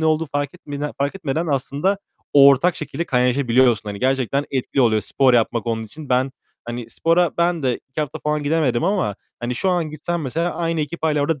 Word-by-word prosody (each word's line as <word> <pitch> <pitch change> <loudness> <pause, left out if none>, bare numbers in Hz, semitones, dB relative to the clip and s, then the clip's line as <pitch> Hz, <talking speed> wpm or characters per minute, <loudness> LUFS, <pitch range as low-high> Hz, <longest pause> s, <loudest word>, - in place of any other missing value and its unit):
ne - - 0
olduğu 155 +1 +2
fark 145 0 -3
etmede 145 -4 -5
fark 140 +3 0
etmeden 165 -3 -2
aslında 145 +7 0 0.3
ortak 140 +4 +6
şekilde 155 +1 -4
kaynaşabiliyorsun. 125 -3 +3
Hani, 100 -1 -5
gerçekten 135 +1 +1
etkili 135 0 -1
oluyor 110 -3 +3
spor 125 +4 +2
yapmak 115 0 +1
onun 115 -1 -1
için. 150 +6 -11
Ben, 130 +1 +1 0.3
hani, 120 -1 -6
spora 170 +4 +2
ben 170 -2 +1
de 125 -2 +1
2 155 - -3
hafta 150 -3 -3
falan 150 0 -1
gidemedim 145 -3 +1
ama, 185 - 0 0.3
hani, 120 +1 -2
şu 190 +10 0
an 170 -4 0
gitsem 165 +3 -3
mesela 165 +6 -1
aynı 165 -1 -1
ekip 150 +3 -5
hâlâ 155 -2 +2
orada 145 -1 0
145 Hz, 195 wpm, -21 LUFS, 125-165 Hz, 0.3 s, ortak